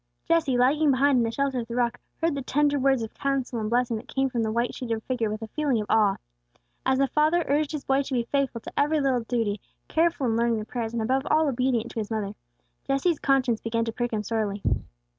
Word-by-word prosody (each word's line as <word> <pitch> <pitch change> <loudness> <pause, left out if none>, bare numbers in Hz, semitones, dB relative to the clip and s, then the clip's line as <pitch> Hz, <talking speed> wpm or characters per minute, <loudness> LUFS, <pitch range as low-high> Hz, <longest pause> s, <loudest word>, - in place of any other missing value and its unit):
Jesse, 315 -7 +2
lagging 290 +5 +3
behind 270 0 +4
in - - +3
the 230 - 0
shelter 270 +2 -1
of 230 - -5
the 235 - -5
rock, 245 -1 0 0.2
heard 330 -1 +1
the 280 - -3
tender 290 +2 +1
words 265 -3 +2
of 220 - -7
counsel 270 -3 -2
and 215 -1 -2
blessing 240 -1 +1
that 215 - -10
came 270 -1 0
from 235 - -1
the 220 -1 0
white 235 +2 0
sheeted 230 -3 -3
figure 245 -4 -1
with 215 +1 -4
a - - -5
feeling 280 -3 0
of 210 - -2
awe. 210 -3 +4 0.7
As 265 - +3
the 275 - +3
father 310 +4 +2
urged 290 +1 +1
his 300 -3 -5
boy 270 +1 +2
to 275 0 -5
be 240 - +1
faithful 265 -1 -1
to - - -9
every 300 +2 +2
little 270 -3 +2
duty, 225 -3 -1 0.3
careful 330 -3 +1
in 225 -2 +1
learning 235 -1 +2
the 215 - -4
prayers, 230 0 -4
and 230 -1 -1
above 265 +4 0
all 310 0 +3
obedient 250 -3 0
to - - -4
his 210 - -4
mother, 210 -3 -2 0.5
Jesse's 280 +4 +1
conscience 260 -4 +2
began 230 0 -1
to 225 - -2
prick 240 +1 -2
him 215 -2 -1
sorely. 210 -2 -2
250 Hz, 240 wpm, -26 LUFS, 225-275 Hz, 0.7 s, behind